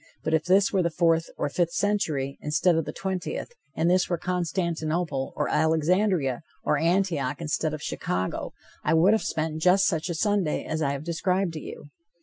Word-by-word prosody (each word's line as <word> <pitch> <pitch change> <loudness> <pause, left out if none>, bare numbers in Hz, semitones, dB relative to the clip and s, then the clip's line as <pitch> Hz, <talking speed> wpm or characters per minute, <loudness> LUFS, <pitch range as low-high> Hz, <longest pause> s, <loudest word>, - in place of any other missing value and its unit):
But 160 - -1
if 160 0 +2
this 190 +3 +3
were 190 - +3
the 170 - +1
fourth 165 0 +2
or - - 0
the 145 - -9
fifth 170 -1 +1
century, 160 -10 -1
instead 155 +4 +2
of 165 -2 0
the - - -4
twentieth, 190 - -4 0.2
and 160 - +1
this 180 +1 +3
were 175 - 0
Constantinople, 170 -4 -2
or - - 0
Alexandria, 160 - +2 0.2
or 150 - +1
Antioch, 165 -5 +1
instead 155 -1 -1
of 150 - -9
Chicago, 90 +1 -3 0.3
I - - +2
would 180 +6 +5
have 220 - +2
spent 155 0 -2
just 185 +3 +5
such 165 -1 0
a 170 - -2
Sunday 200 -3 0
as 160 0 -3
I 140 -2 +1
have 140 +1 -5
described 175 +2 0
to 155 - -5
you. 145 - -9
165 Hz, 190 wpm, -26 LUFS, 155-185 Hz, 0.3 s, would